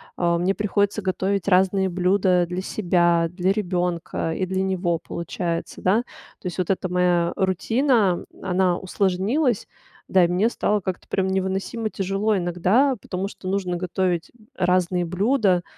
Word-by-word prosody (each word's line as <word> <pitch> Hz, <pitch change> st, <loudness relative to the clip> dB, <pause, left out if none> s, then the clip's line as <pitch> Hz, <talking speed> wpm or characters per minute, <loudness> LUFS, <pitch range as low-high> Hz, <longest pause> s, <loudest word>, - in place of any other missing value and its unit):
А, 170 Hz, -1 st, +1 dB
мне 180 Hz, +3 st, +1 dB
приходится 205 Hz, 0 st, 0 dB
готовить 190 Hz, 0 st, -1 dB
разные 190 Hz, 0 st, +3 dB
блюда 180 Hz, 0 st, +2 dB
для 180 Hz, +1 st, -3 dB
себя, 175 Hz, -4 st, +2 dB
для 180 Hz, +1 st, 0 dB
ребёнка 180 Hz, -4 st, -2 dB
и 185 Hz, -, -1 dB
для 190 Hz, +1 st, -1 dB
него, 180 Hz, -3 st, 0 dB
получается, 170 Hz, +1 st, -4 dB
да. 210 Hz, +6 st, +2 dB, 0.4 s
То -, -, -22 dB
есть 180 Hz, -2 st, -4 dB
вот 180 Hz, -, -1 dB
эта 190 Hz, -1 st, 0 dB
моя 180 Hz, -1 st, +1 dB
рутина, 205 Hz, -, +1 dB, 0.2 s
она 185 Hz, -1 st, +1 dB
усложнилась. 200 Hz, -, 0 dB, 0.4 s
Да, 185 Hz, -1 st, +4 dB
и -, -, +4 dB
мне 185 Hz, +5 st, +2 dB
стало 210 Hz, -3 st, 0 dB
как-то 185 Hz, -1 st, -5 dB
прям 190 Hz, 0 st, 0 dB
невыносимо 190 Hz, +4 st, -2 dB
тяжело 195 Hz, +2 st, 0 dB
иногда, 185 Hz, +10 st, +2 dB
потому 185 Hz, +2 st, -4 dB
что 185 Hz, -2 st, -7 dB
нужно 190 Hz, -2 st, -1 dB
готовить 180 Hz, -1 st, -1 dB, 0.2 s
разные 180 Hz, -1 st, +1 dB
блюда, 185 Hz, +1 st, +1 dB
185 Hz, 145 wpm, -23 LUFS, 180-195 Hz, 0.4 s, Да